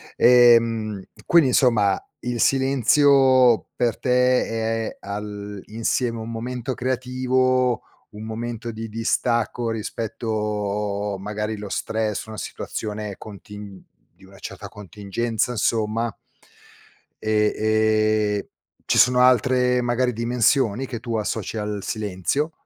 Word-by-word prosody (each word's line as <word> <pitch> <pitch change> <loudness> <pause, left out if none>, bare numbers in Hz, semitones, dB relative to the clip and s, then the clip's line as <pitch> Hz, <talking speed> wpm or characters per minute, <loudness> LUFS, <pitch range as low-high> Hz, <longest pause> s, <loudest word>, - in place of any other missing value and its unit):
ehm, 115 -4 +4 0.2
quindi, 165 -6 +5
insomma, 110 -7 +3 0.2
il 120 0 -4
silenzio 130 -1 +4
per 120 -3 0
te 125 0 +2 0.4
è - - -14
all'insieme 105 +3 -3
un 110 +1 -6
momento 125 +2 -4
creativo, 130 -1 0 0.3
un 105 +1 -9
momento 115 +1 -5
di 115 0 -6
distacco 115 +1 -1
rispetto 105 -2 -3
magari 105 +2 -4
lo 105 -1 -7
stress, 110 +1 -2
una 110 -1 -8
situazione 105 -1 -5
contin 105 -1 -11 0.3
di 95 - -23
una 95 0 -16
certa - - -8
contingenza, 105 +3 -3
insomma. 115 0 0 1.1
E, 105 -1 +2 0.8
ehm, - - -6 0.4
ci - - +1
sono 125 0 +5
altre 125 0 +3
magari 120 +1 0
dimensioni 120 +1 +1
che 120 -3 -6
tu 115 -1 -4
associ 110 0 -3
al 105 -1 -3
silenzio? 105 - -2
115 Hz, 105 wpm, -23 LUFS, 105-125 Hz, 1.1 s, quindi